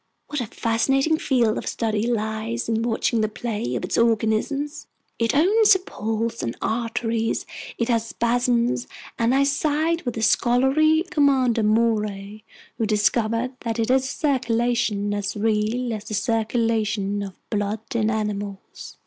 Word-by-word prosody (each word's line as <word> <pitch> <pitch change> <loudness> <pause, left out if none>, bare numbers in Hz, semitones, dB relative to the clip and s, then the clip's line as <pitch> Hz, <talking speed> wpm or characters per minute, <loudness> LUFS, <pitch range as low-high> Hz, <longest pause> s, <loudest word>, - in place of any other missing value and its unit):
What 295 -3 -2
a 235 - -4
fascinating 270 +9 +1
field 235 -5 +1
of - - -8
study 220 -1 -1
lies 220 0 -2
in 225 -1 0
watching 230 0 0
the 215 - +1
play 210 - -3
of - - -2
its - - -1
organism. 230 +5 +1 0.5
It 230 +3 +1
owns 410 +7 +5
a - - 0
pulse 225 - -3
and 115 - -4
arteries, 225 0 -1 0.3
it 235 - 0
has 230 -2 +1
spasms, 240 +1 0 0.3
and 235 +3 +2
I 275 - +4
side 310 +4 +1
with 245 - -4
the 225 - -2
scholarly 265 +8 +3
Commander 260 -5 +3
Maury, 215 -2 0 0.4
who 225 - +1
discovered 225 +3 +1
that 230 -1 -3
it 225 0 0
has 260 +1 +3
a - - -2
circulation 240 -7 0
as 205 0 -3
real 220 +3 0
as 210 -1 -6
the 215 - -4
circulation 220 -2 0
of 195 -2 -6 0.2
blood 205 0 -1
in 220 -2 +1
animals." 205 -2 -5
230 Hz, 150 wpm, -23 LUFS, 215-250 Hz, 0.5 s, owns